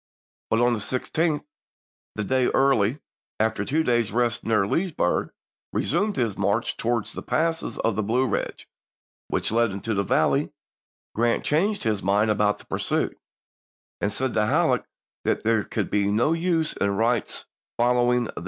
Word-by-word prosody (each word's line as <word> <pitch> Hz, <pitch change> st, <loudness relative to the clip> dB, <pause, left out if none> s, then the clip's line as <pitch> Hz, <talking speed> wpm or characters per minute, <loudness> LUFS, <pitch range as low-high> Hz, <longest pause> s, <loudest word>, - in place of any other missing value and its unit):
But 115 Hz, -, +2 dB
on 120 Hz, 0 st, +4 dB
the 115 Hz, -, -1 dB
16th, 150 Hz, +9 st, -1 dB, 0.7 s
the 110 Hz, -, -2 dB
day 130 Hz, +4 st, +2 dB
Early, 135 Hz, -1 st, +2 dB, 0.4 s
after 110 Hz, -1 st, +1 dB
two 155 Hz, +9 st, +1 dB
days' 120 Hz, -6 st, +1 dB
rest 120 Hz, +1 st, 0 dB
near 110 Hz, -3 st, +2 dB
Leesburg, 165 Hz, -, 0 dB, 0.4 s
resumed 200 Hz, +8 st, 0 dB
his 115 Hz, -7 st, 0 dB
march 100 Hz, +3 st, 0 dB
towards 115 Hz, -2 st, -1 dB
the -, -, -6 dB
passes 165 Hz, +1 st, -1 dB
of 115 Hz, -2 st, 0 dB
the 110 Hz, -, 0 dB
Blue 120 Hz, +5 st, +1 dB
Eidge 105 Hz, -, -3 dB, 0.6 s
which -, -, -1 dB
led 115 Hz, +1 st, +3 dB
into 100 Hz, +3 st, -3 dB
the 100 Hz, -1 st, +1 dB
valley, -, -, +1 dB, 0.6 s
Grant 115 Hz, +1 st, +1 dB
changed 200 Hz, +8 st, +1 dB
his 110 Hz, -3 st, 0 dB
mind 105 Hz, +3 st, +2 dB
about 105 Hz, 0 st, +2 dB
the -, -, -17 dB
pursuit, -, -, -1 dB, 0.9 s
and 105 Hz, -, +1 dB
said 130 Hz, +4 st, -1 dB
to 105 Hz, -1 st, +2 dB
Halleck -, -, +2 dB, 0.4 s
that -, -, 0 dB
there 115 Hz, -1 st, +2 dB
could -, -, -3 dB
be 100 Hz, -1 st, +2 dB
no 120 Hz, +10 st, +2 dB
use 165 Hz, -2 st, 0 dB
in 100 Hz, 0 st, -1 dB
Wright's 115 Hz, +1 st, 0 dB, 0.3 s
following 125 Hz, 0 st, +3 dB
the 115 Hz, -, -5 dB
ibid. -, -, -7 dB
115 Hz, 160 wpm, -25 LUFS, 105-130 Hz, 0.9 s, on